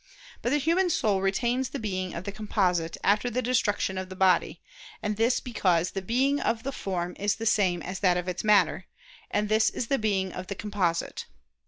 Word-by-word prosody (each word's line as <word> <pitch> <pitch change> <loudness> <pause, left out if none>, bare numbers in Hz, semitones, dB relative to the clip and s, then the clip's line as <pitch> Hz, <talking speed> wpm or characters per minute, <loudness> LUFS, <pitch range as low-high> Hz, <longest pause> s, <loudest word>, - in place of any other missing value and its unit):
But - - 0
the 290 - +3
human 335 +6 +2
soul 205 - +1
retains 240 +7 0
the 280 - -5
being 185 -6 -3
of 170 - -5
the 200 - -4
composite 185 -5 0
after 210 +4 +2
the 255 +1 -2
destruction 205 -5 0
of 185 0 -6
the 185 - -8
body: 180 -3 +2 0.4
and 210 -1 -1
this 230 +4 +2
because 180 -8 +1
the 195 - -4
being 260 +8 +1
of 230 -4 -1
the 275 - -2
form 180 -7 -3
is 205 0 +1
the 225 - -6
same 185 -6 +2
as 185 +1 -5
that 180 -3 +3
of 180 0 -3
its 180 0 -3
matter, 195 -4 +3 0.4
and 210 0 0
this 220 +1 +3
is 230 - -4
the 275 - +2
being 195 -3 0
of 180 0 -6
the 200 - -4
composite. 190 -5 -2
205 Hz, 205 wpm, -27 LUFS, 185-230 Hz, 0.4 s, the